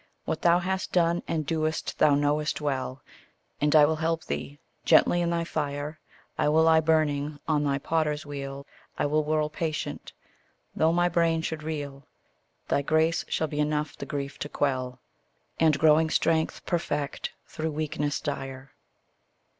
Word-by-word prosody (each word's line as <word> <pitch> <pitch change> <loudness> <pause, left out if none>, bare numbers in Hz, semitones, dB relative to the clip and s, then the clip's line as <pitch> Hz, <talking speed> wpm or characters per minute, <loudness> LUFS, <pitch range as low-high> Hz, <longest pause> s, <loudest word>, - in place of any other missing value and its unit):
What 160 - -2
thou 170 0 +5
hast 190 +1 -2
done 170 -1 +2
and 155 -2 -1
doest 155 0 -2
thou 150 -2 +5
know'st 145 +1 0
well, 135 -3 -3 0.6
And 150 +1 +3
I 150 -1 +8
will 160 +1 0
help 165 +1 -1
thee: 145 - -5 0.3
gently 175 - +5
in 170 - +1
thy 170 0 0
fire 150 -1 -3 0.4
I - - +3
will 160 +2 +4
lie 160 0 +6
burning; 155 -2 +1
on 150 -2 +2
thy 140 -1 +1
potter's 155 +1 -1
wheel 140 -1 -6 0.3
I - - +1
will 155 +1 +2
whirl 155 0 +1
patient, 155 +1 -4 0.6
though 160 +1 +3
my 175 +1 +3
brain 165 -1 +1
should 160 -1 -3
reel; 145 -3 -5 0.6
Thy - - +1
grace 160 +3 +1
shall 160 - 0
be 150 -1 -4
enough 150 0 0
the - - -7
grief 140 -1 -4
to 145 - -4
quell, 130 -4 -1 0.6
And 155 -2 +4
growing 160 +1 +4
strength 160 0 +1
perfect 150 -5 -2
through 160 +1 -4
weakness 150 -1 -2
dire. 135 -2 -5
155 Hz, 155 wpm, -27 LUFS, 145-160 Hz, 0.6 s, I